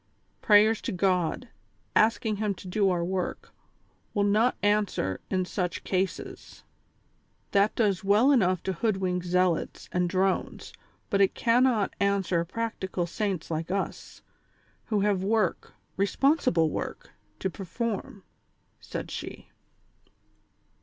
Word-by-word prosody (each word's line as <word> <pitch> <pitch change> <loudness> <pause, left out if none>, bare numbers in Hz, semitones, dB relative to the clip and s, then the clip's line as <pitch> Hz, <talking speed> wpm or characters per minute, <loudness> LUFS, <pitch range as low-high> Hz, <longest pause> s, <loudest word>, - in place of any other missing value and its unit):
Prayers 215 +1 +5
to - - -3
God, 185 +4 0 0.5
asking 220 -1 +2
Him 210 -1 -1
to 185 - -11
do 195 +1 +2
our 175 -2 0
work, 185 0 -3 0.6
will 205 - +2
not 215 +5 +2
answer 205 - +1
in 185 -1 0
such 180 -2 -3
cases; 190 0 -3 0.9
that 200 +1 +3
does 205 -6 +1
well 210 +8 +4
enough 185 - +2
to 190 - -1
hoodwink 185 -2 -1
zealots 180 -1 0
and 180 -1 0
drones, 190 +1 -1 0.4
but 200 -1 +3
it 195 - +3
cannot 235 -3 +2
answer 195 -4 +1
practical 190 -2 -3
saints 185 -2 -3
like 160 +1 -3
us, 195 +1 -4 0.6
who 210 -3 0
have 200 -2 +1
work, 210 -2 0 0.2
responsible 195 - +2
work, - - -5 0.3
to - - -2
perform," 200 +1 -4 0.6
said - - -6
she. - - -7
195 Hz, 120 wpm, -27 LUFS, 180-215 Hz, 0.9 s, Prayers